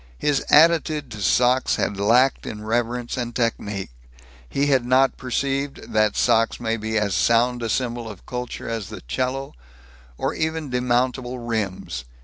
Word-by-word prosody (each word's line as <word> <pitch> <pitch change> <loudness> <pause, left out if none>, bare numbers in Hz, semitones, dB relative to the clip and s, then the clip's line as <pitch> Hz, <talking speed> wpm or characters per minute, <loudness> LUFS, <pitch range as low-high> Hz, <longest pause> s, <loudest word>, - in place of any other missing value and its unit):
His 145 -2 +1
attitude 155 -3 +4
to 105 -2 -7
socks 125 +5 +3
had 100 - -2
lacked 125 +6 +3
in 105 0 -6
reverence 120 +2 -1
and 120 -1 -4
technique. 105 - -2 0.6
He 140 - 0
had 135 -3 +3
not 130 +2 +3
perceived 135 +2 -3
that 110 -1 +2
socks 115 -1 +2
may 115 -1 -1
be 110 0 -2
as 105 -2 0
sound 120 +6 +2
a 115 - -2
symbol 120 -1 -2
of 105 -4 -11
culture 125 -1 -5
as 115 -4 -4
the - - -8
'cello 130 - -3 0.6
or - - -1
even 160 -3 -2
demountable 125 0 -1
rims. 95 - -3
120 Hz, 150 wpm, -23 LUFS, 110-130 Hz, 0.6 s, attitude